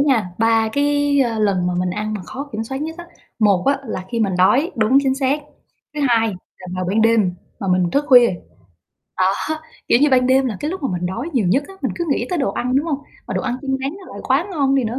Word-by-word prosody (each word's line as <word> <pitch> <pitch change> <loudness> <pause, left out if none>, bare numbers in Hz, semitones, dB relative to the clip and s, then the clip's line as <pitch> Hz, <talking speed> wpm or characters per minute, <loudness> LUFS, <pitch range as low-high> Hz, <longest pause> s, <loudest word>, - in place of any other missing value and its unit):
nha, 265 -8 +2
ba 225 0 +3
cái, 285 +1 +1
à, 230 -2 -2
lần 195 -4 +1
mà 180 - -1
mình 180 0 0
ăn 210 +3 -3
mà 205 - -5
khó 275 +10 -7
kiểm 220 +1 -3
soát 265 +4 -5
nhất 320 +1 -5
á, 345 - -7 0.3
một 200 -5 +3
á 275 0 +3
là 185 -4 -4
khi 235 -1 -1
mình 200 -4 +1
đói 260 - +4
đúng, 230 +4 +4
chính 265 -1 +1
xác. 275 +2 0 0.5
Thứ 300 - -3
hai 225 -2 +3 0.3
là 185 - -11
vào 185 0 -2
ban 200 +5 +1
đêm 220 -5 +3 0.3
mà 195 - -3
mình 180 -1 +2
thức 285 +8 +1
khuya, 245 -3 +7 0.9
đó, 185 +1 +3 0.6
kiểu - - +5
như, 295 - +4
ban 255 -1 +4
đêm 265 +1 +3
là 225 -5 -3
cái 300 - -2
lúc 375 -2 -6
mà 270 - 0
mình 180 0 -2
đói 230 - -4
nhiều 240 -9 +1
nhất 270 +10 +2
á, 390 - -11
mình - - -1
cứ 345 - -2
nghĩ 245 -3 0
tới 360 - 0
đồ 270 - 0
ăn, 250 +2 -1
đúng 290 +4 +1
hông? 295 -4 -1 0.3
Mà - - -4
đồ - - -1
ăn 250 -1 -2
chiên 275 - -4
rán 270 +1 -2
nó 375 - -12
lại - - -8
quá - - +2
ngon 275 -5 +1
đi 270 -2 +2
nữa. 230 +3 -2
245 Hz, 265 wpm, -20 LUFS, 210-280 Hz, 0.9 s, khuya